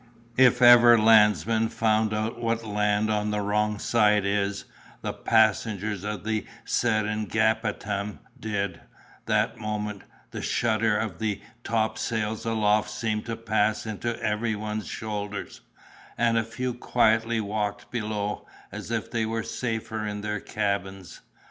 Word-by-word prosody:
If 125 -1 +5
ever 120 -1 +9
landsmen 110 0 +4
found 110 -1 +1
out 110 +2 -2
what 115 -1 -1
land 105 0 +1
on 105 0 0
the 105 0 -1
wrong 105 +1 0
side 105 -2 +3
is, 100 0 -1 0.4
the - - -2
passengers 110 -2 +1
of 105 -3 -4
the 110 -1 -2 0.2
Seringapatam 110 -2 0 0.2
did, 100 -5 -3 0.5
that - - +1
moment; 105 -2 -4 0.3
the - - -5
shudder 110 -2 +1
of 110 -4 -3
the 110 -2 -1 0.2
topsails 110 0 -1
aloft 105 -1 +2
seemed 105 0 -3
to 115 - -2
pass 110 -1 0
into 115 +2 -3
every 110 +1 0
one's 105 0 -4
shoulders, 105 -2 -5 0.6
and 115 -1 +2
a 115 - +2
few 125 +2 -4
quietly 115 -1 +2
walked 105 -1 -3
below, 105 -3 -3 0.2
as - - -7
if 115 -2 -3
they 115 -2 0
were 115 0 -2
safer 110 -2 -3
in 105 0 -4
their 105 0 -2
cabins. 95 -3 -3
110 Hz, 130 wpm, -26 LUFS, 105-115 Hz, 0.6 s, ever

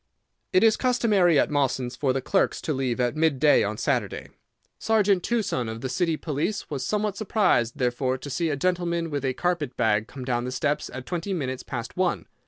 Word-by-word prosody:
"It 185 - +4
is 225 -1 +5
customary 210 - +3
at - - +2
Mawson's 130 -3 0
for 135 -1 0
the 130 0 -2
clerks 195 - +1
to 155 - -2
leave 130 -3 -1
at 125 +2 +1
midday 155 -2 +4
on 105 +1 -2
Saturday. - - -1 0.5
Sergeant 205 -4 +2
Tuson, 195 - -1
of 110 +1 -6
the 130 - -3
City 165 +3 0
Police, 155 +8 -3
was 140 -3 -3
somewhat 210 -1 -1
surprised, 190 - +1
therefore 130 +1 0
to 145 - -8
see 165 +4 0
a 145 - 0
gentleman 170 +1 -1
with 145 -2 -2
a 130 -1 -1
carpet 170 -8 -1
bag 110 -2 +2
come 130 0 -8
down 120 -2 0
the 125 - -4
steps 145 +2 -1
at 130 0 -7
twenty 180 +2 -3
minutes 130 -7 -3
past 120 -1 -6
one. 180 -1 0
145 Hz, 195 wpm, -25 LUFS, 130-180 Hz, 0.5 s, is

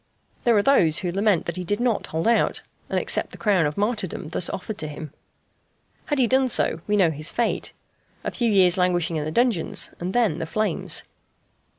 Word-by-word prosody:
There 235 -3 +4
are 200 - +3
those 175 - +4
who 175 - -1
lament 200 -1 +1
that 170 +1 -4
he 180 - -3
did 205 +5 -2
not 240 -3 0
hold 160 +5 -2
out, 235 - +1 0.3
and - - -1
accept - - 0
the - - -12
crown 195 -8 +2
of 150 - -6
martyrdom 205 -7 -2
thus 175 +1 +3
offered 205 +2 -6
to 155 - -4
him. 150 0 -8 0.9
Had 290 - -1
he 260 - +4
done 260 +2 +2
so 170 -8 +2
we 210 0 +1
know 180 -5 +4
his 155 +1 -2
fate 235 - -1 0.5
a - - -3
few 235 -2 0
years' 190 -3 +4
languishing 175 -2 +1
in 150 - -3
the 155 - -3
dungeons, 235 -3 0
and 180 +2 -3
then 220 -10 +1
the 165 - -4
flames. 215 0 -1
190 Hz, 205 wpm, -23 LUFS, 165-225 Hz, 0.9 s, There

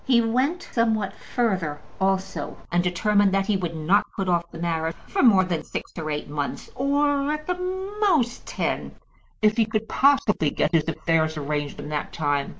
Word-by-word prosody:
He 250 -3 +4
went 255 +9 +1
somewhat 220 -4 +1
further 185 -11 -1 0.2
also, 190 -5 -1
and 175 +1 +2
determined 200 +3 +2
that 195 0 +2
he 210 - +1
would 175 -3 -2
not 165 +6 +2
put 195 -2 -2
off 170 -1 +1
the - - -10
marriage 165 -1 -1
for 390 - 0
more 205 -7 +6
than 175 -3 -2
six - - -6
or 155 -2 -4
eight 150 0 -3
months, 145 -1 -4
or, 285 +1 +1
at 305 0 -3
the 360 0 -2 0.4
most, 305 - +2
ten, - - -2 0.5
if 215 +1 +4
he 225 - +4
could 220 0 -2
possibly 265 - +3
get 150 - 0
his 165 -3 +2
affairs 160 -1 0
arranged 145 0 -3
in 150 - -6
that 150 -1 -3
time. 145 -3 0
190 Hz, 180 wpm, -24 LUFS, 160-235 Hz, 0.5 s, more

